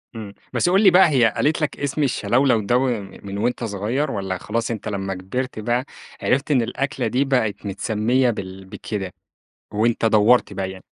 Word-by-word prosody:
إمم، 105 -3 -7 0.2
بس 175 - +2
قُل 195 +3 +4
لي 190 - +8
بقى 180 -2 +6
هي 120 -7 +3
قالت 155 +2 +1
لك 150 - -2
اسم 140 +1 -1
الشلَولَو 125 0 +2
ده 120 +5 +2
و 130 +1 +1 0.4
من 100 0 -6
وأنت 120 +3 -1
صغير؟ 115 +8 -2
والَّا 95 -2 -3
خلاص 115 +5 -3
أنت 110 -1 -5
لمّا 95 -2 -3
كبرت 110 +6 -4
بقى 120 +4 -1 0.4
عرفت 140 +4 +1
إن 130 -4 +4
الأكلة 135 +5 -2
دي 135 +3 +1
بقت 125 -7 0
متسمية 110 +5 +1
بال 95 -3 -6
بكده، 95 -1 -6 0.6
وأنت 115 +2 +1
دوّرت 110 0 +4
بقى 95 -1 -3
يعني؟ 95 - -12
115 Hz, 180 wpm, -22 LUFS, 100-130 Hz, 0.6 s, لي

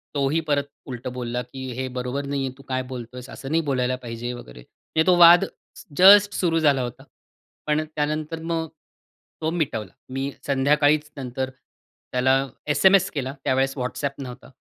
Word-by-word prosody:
तोही 140 +3 +1
परत 145 -1 +2 0.2
उलटं 125 -1 -6
बोलला, 125 -1 -3
की 130 +1 -7
"हे 130 - -2
बरोबर 125 +3 -3
नाही 140 0 -2
आहे. 130 - -3
तू 135 - -15
काय 130 0 -1
बोलतोयेस? 125 +1 -8
असं 135 - -8
नाही 165 +1 +3
बोलायला 130 -1 +1
पाहिजे." 120 +1 -5
वगैरे. 60 - -11
म्हणजे 160 - -3
तो 180 -1 +5
वाद 170 0 +8 0.5
जस्ट 200 +2 +8
सुरू 165 -3 +1
झाला 145 -4 +3
होता. 125 +2 -6 0.6
पण 150 +1 +2
त्यानंतर 155 +2 -2
मग 165 0 -2 0.7
तो 160 - 0
मिटवला. 125 - -2 0.2
मी 135 +2 -3 0.2
संध्याकाळीच 145 +2 +3
नंतर 130 0 -3 0.6
त्याला 125 +1 +3 0.4
एस-एम-एस 190 +2 +5
केला, 135 -2 -3
त्यावेळेस 135 0 +1
WhatsApp 140 +2 -3
नव्हता. 125 0 -10
135 Hz, 155 wpm, -24 LUFS, 125-155 Hz, 0.7 s, वाद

